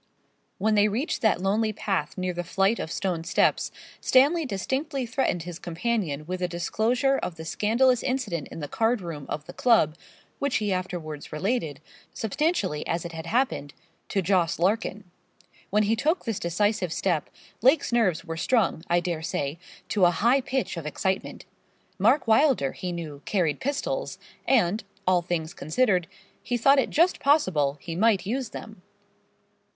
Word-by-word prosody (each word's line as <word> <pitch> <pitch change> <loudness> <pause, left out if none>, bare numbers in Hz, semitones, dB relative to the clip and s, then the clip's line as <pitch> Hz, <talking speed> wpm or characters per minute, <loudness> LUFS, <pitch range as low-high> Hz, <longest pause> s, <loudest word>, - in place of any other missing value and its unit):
When 215 +3 +1
they 210 0 +5
reached 235 +9 -2
that 220 -5 +2
lonely 215 +3 +1
path 195 -7 -2
near 185 -1 -1
the 175 0 -3
flight 195 +5 +1
of 160 - -4
stone 180 -4 -2
steps, 170 - +2 0.3
Stanley 290 +4 +4
distinctly 265 +6 -2
threatened 235 -8 -1
his 175 0 -7
companion 175 -4 -2
with 185 +2 -4
a 180 - +1
disclosure 230 - +1
of 170 - -4
the 160 -1 -8
scandalous 235 +8 +2
incident 255 - -2
in - - -8
the 145 - -4
card 225 - +1
room 160 -5 -6
of 150 0 -4
the 175 - -10
club, 180 - +3 0.4
which 280 -2 0
he 205 -2 +1
afterwards 175 -5 -5
related, 160 - -2 0.3
substantially 220 - 0
as 170 0 -1
it 170 - -5
had 165 0 -7
happened, 230 - 0 0.3
to 195 - 0
Jos. 175 -2 +2
Larkin. 205 +3 0 0.7
When 210 +2 +3
he 215 +2 +2
took 315 +10 0
this 225 -4 -2
decisive 180 +1 0
step, - - 0 0.3
Lake's 270 +2 +4
nerves 195 -9 +2
were 165 -1 -5
strung, 215 -4 +1
I 175 0 +3
dare 170 -2 -3
say, 145 -1 -3 0.3
to 200 -4 +3
a - - +6
high 235 +10 +3
pitch 260 -7 -2
of 160 -2 -5
excitement. 190 +6 -2 0.5
Mark 240 +8 +3
Wylder, 225 - +4
he 180 - -5
knew, 155 -5 -6
carried 165 -8 0
pistols, 290 - -2 0.3
and, 215 -6 +3 0.2
all 180 -1 +3
things 170 -2 -3
considered, 180 - +1 0.3
he 245 0 -1
thought 275 +4 +5
it 260 - +1
just 340 +4 +3
possible 180 - +2
he 165 +3 -6
might 210 0 +3
use 245 +3 -2
them. 215 -2 -9
195 Hz, 165 wpm, -26 LUFS, 170-240 Hz, 0.7 s, a